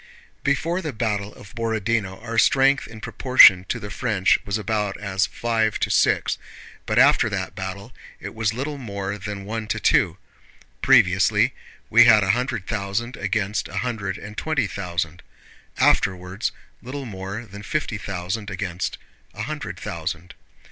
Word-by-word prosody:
Before 165 +6 0
the 155 -5 -4
battle 105 -3 -2
of 100 - -14
Borodinó 110 -4 -1
our 115 -1 0
strength 135 +1 +4
in 110 -1 -11
proportion 105 -7 +6
to - - -1
the 105 - -7
French 100 -3 +2
was 100 +1 -2
about 105 -2 -2
as 100 -1 0
five 110 -2 0
to - - 0
six, - - +2 0.5
but 110 - 0
after 135 -3 +5
that 95 -3 -3
battle 100 +4 -6 0.3
it - - -7
was 110 -1 0
little 140 +5 -4
more 100 -4 -4
than 100 0 -6
one 110 +1 -4
to - - -1
two: - - +3 0.6
previously - - +4 0.4
we - - +8
had 105 -2 +7
a 95 - +3
hundred 125 -3 -2
thousand 110 +3 -3
against 105 +1 -1
a - - -7
hundred 105 -6 -3
and 105 +1 -10
twenty 155 -7 0
thousand; 85 -4 -4 0.6
afterwards 95 +2 +1 0.3
little 135 +3 -6
more 100 +1 -6
than 100 -1 -10
fifty 110 -1 -2
thousand 100 +1 -4
against 90 -2 -3 0.4
a - - -4
hundred - - -5
thousand. 85 +1 -5
105 Hz, 150 wpm, -23 LUFS, 100-115 Hz, 0.6 s, we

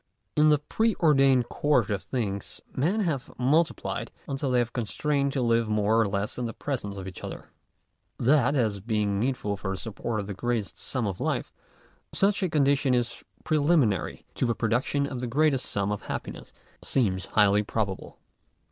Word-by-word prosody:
In 155 0 +5
the 150 - +5
pre 220 +9 0
ordained 135 -6 +4
course 125 -8 +2
of 100 -2 -1
things, 100 -6 -3 0.2
men 180 +11 +1
have 155 -9 -2
multi 150 +7 +3
' - - -28
plied - - -4 0.2
until 135 0 -2
they 125 -1 +3
are - - +1
constrained 140 +6 -1
to 130 - 0
live 115 -1 +2
more 105 +1 +2
or 110 - +2
less 100 +4 -2
in 120 -2 -2
presence 110 -8 -4
of 95 -1 -6
each 95 - -9
other. - - -7 0.7
That, 140 +2 +3
as 110 -6 +1
being 105 -1 0
needful 110 -4 -1
for 95 0 -3
the - - -7
support 110 +3 -4
of - - -6
the 100 - -5
greatest 115 +1 -2
sum 125 -4 -2
of 95 -3 -3
life, - - -1 0.6
such 200 +1 +2
a 185 - +1
condition 140 -3 +3
is 120 -1 -2 0.2
preliminary 145 - +1
to 125 - 0
the 115 - 0
production 120 +5 0
of 135 -3 -5
the 125 - -3
greatest 140 +1 +2
sum 100 0 -1
of 105 - -3
happiness, - - -6 0.3
seems 95 -8 0
highly 105 -1 +4
probable. 105 -2 -3
120 Hz, 180 wpm, -27 LUFS, 105-140 Hz, 0.7 s, In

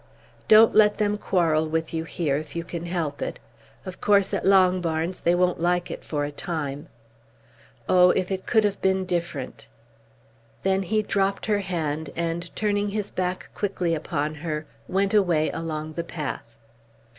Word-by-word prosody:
Don't 220 +1 +7
let 210 -1 +5
them 210 -1 +1
quarrel 165 -6 +1
with 160 +1 -2
you 160 0 -2
here 155 -3 -1
if 150 +2 -5
you 170 - -2
can 170 0 -6
help 165 -5 -3
it. - - -3 0.5
Of 185 - -8
course 200 -2 +3
at - - -1
Longbarns 180 -3 +2
they 170 +1 +2
won't 180 -1 +1
like 175 +1 0
it - - -7
for 145 -2 -2
a 145 - -5
time. 145 -1 -4 1.0
Oh, 180 -1 +6
if 180 +1 +1
it 190 -1 -3
could 220 -2 +4
have 205 -1 -1
been 190 0 +1
different!" 170 -7 -4 1.0
Then 190 0 +2
he 215 +3 0
dropped 195 -1 0
her 210 -2 +1
hand, 160 -5 -3
and 170 +1 -2
turning 205 -1 0
his 205 0 -3
back 180 0 -3
quickly 185 -4 -1
upon 155 -1 -2
her, 155 0 -4 0.2
went 195 +2 0
away 175 -7 +3
along 155 -1 -4
the 170 - -3
path. 150 -8 -6
175 Hz, 165 wpm, -25 LUFS, 160-195 Hz, 1.0 s, Don't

